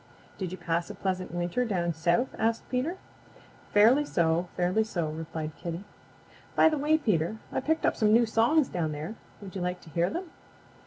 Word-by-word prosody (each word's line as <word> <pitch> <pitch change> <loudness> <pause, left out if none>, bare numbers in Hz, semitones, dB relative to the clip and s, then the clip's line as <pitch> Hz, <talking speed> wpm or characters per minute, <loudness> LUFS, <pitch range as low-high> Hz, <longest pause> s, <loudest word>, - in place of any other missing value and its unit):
"Did 185 -3 -3
you 185 - -5
pass 170 -1 -1
a - - -7
pleasant 185 -1 -2
winter 175 +7 -1
down 175 -7 0
South?" 170 - +1
asked 225 +1 0
Peter. 270 +9 -1 0.7
"Fairly 230 +8 +6
so. 170 - +1
Fairly 180 +5 +2
so," 175 -7 -2
replied 160 -1 -5
Kitty. 170 +2 -5 0.7
"By - - +6
the 310 - -1
way, 305 +2 +3
Peter, 210 - 0
I - - 0
picked 320 +4 0
up - - +2
some 215 -2 +3
new 235 +2 +6
songs 235 +7 +3
down 160 -3 -2
there. 155 +8 -5 0.3
Would 195 0 -9
you 190 - -3
like 180 0 -2
to 160 - -14
hear 170 +3 +1
them?" 350 - -5
185 Hz, 190 wpm, -28 LUFS, 170-235 Hz, 0.7 s, Fairly